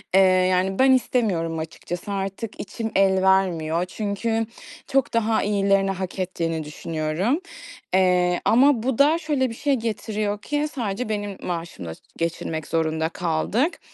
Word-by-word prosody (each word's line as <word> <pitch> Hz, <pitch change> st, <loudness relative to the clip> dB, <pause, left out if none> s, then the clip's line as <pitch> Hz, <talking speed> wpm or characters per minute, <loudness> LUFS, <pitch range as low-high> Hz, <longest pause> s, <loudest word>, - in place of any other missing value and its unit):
eee, -, -, +8 dB
yani, 185 Hz, 0 st, +3 dB
ben 265 Hz, 0 st, +6 dB
istemiyorum 195 Hz, -11 st, +1 dB
açıkçası. 170 Hz, +4 st, -6 dB
Artık 195 Hz, +2 st, -4 dB
içim 225 Hz, +2 st, -4 dB
el 190 Hz, -1 st, +4 dB
vermiyor 180 Hz, -3 st, +2 dB
çünkü 220 Hz, +4 st, -2 dB, 0.4 s
çok 270 Hz, -2 st, +1 dB
daha 225 Hz, -1 st, +2 dB
iyilerini 195 Hz, -1 st, +2 dB
hak 190 Hz, 0 st, -5 dB
ettiğini 165 Hz, -3 st, -2 dB
düşünüyorum. 155 Hz, -, -1 dB, 0.5 s
Eee, 180 Hz, -1 st, +3 dB
ama 250 Hz, 0 st, +5 dB
bu 255 Hz, -2 st, 0 dB
da 300 Hz, +3 st, +5 dB
şöyle 295 Hz, -6 st, 0 dB
bir 230 Hz, -, -7 dB
şey 285 Hz, +3 st, 0 dB
getiriyor 215 Hz, -2 st, -2 dB
ki 295 Hz, +4 st, -1 dB
sadece 220 Hz, -2 st, -2 dB
benim 205 Hz, -2 st, -3 dB
maaşımla 165 Hz, -, -5 dB, 0.2 s
geçinmek 165 Hz, -2 st, -3 dB
zorunda 160 Hz, 0 st, 0 dB
kaldık 190 Hz, -, 0 dB
195 Hz, 135 wpm, -23 LUFS, 175-225 Hz, 0.5 s, eee